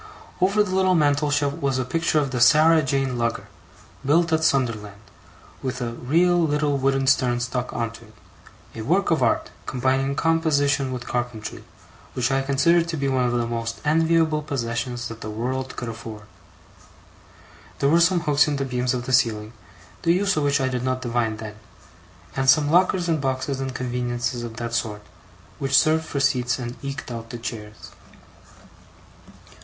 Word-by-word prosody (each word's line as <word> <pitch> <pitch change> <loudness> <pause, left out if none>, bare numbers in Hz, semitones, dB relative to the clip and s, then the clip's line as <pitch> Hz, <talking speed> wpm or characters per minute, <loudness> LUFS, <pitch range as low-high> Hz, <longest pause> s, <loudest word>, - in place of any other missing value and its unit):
Over 200 +3 +3
the 185 -3 -4
little 185 -1 +3
mantelshelf, 145 -2 +2
was 135 -2 0
a 130 - -1
picture 165 +4 0
of 140 -3 +1
the 125 -2 -2
'Sarah 155 +5 +6
Jane' 135 -2 -1
lugger, 115 -4 -1 0.6
built 165 +4 +2
at 160 0 +2
Sunderland, 115 -9 0 0.6
with 130 -1 -3
a 120 -2 -3
real 170 +9 +2
little 150 -2 +1
wooden 135 0 +1
stern 125 -2 +2
stuck 120 +1 -3
on 115 -1 -2
to 115 0 -13
it; 110 0 -20 0.6
a - - -6
work - - +1
of - - +2
art, - - +1 0.2
combining 135 +2 0
composition 145 -4 +1
with 125 -1 -5
carpentry, 120 -3 -4 0.5
which 125 +1 0
I 135 0 +2
considered 140 +5 +2
to 165 -1 -3
be 140 -1 -1
one 130 -2 +1
of 120 - +1
the 120 -1 0
most 115 -1 -4
enviable 160 0 +2
possessions 120 -4 -3
that 115 -1 -9
the 110 - -5
world 130 +4 -3
could 120 - -5
afford. 110 -2 -8 1.5
There 140 - +1
were 165 +3 +4
some 175 0 +3
hooks 145 -2 +3
in 150 - 0
the 135 0 -2
beams 125 0 -1
of 120 -1 -4
the 130 - -3
ceiling, 110 -3 +1 0.5
the 170 - +3
use 195 +2 +1
of 155 - 0
which 145 0 +2
I 130 - +1
did 125 -2 -2
not 130 0 -1
divine 115 -2 -1
then; 110 -1 -8 0.8
and 135 0 +1
some 145 +1 +4
lockers 180 0 +3
and 160 -3 0
boxes 135 0 -2
and 135 -1 -3
conveniences 120 -1 -2
of 115 -1 -7
that 115 0 -4
sort, 110 -3 -2 0.6
which 135 -1 +2
served 160 +1 +3
for 140 - -3
seats 125 -2 +1
and 120 -1 -5
eked 135 -2 -5
out 115 -1 -7
the 120 - -6
chairs. 110 -2 -8
130 Hz, 175 wpm, -23 LUFS, 120-150 Hz, 1.5 s, Sarah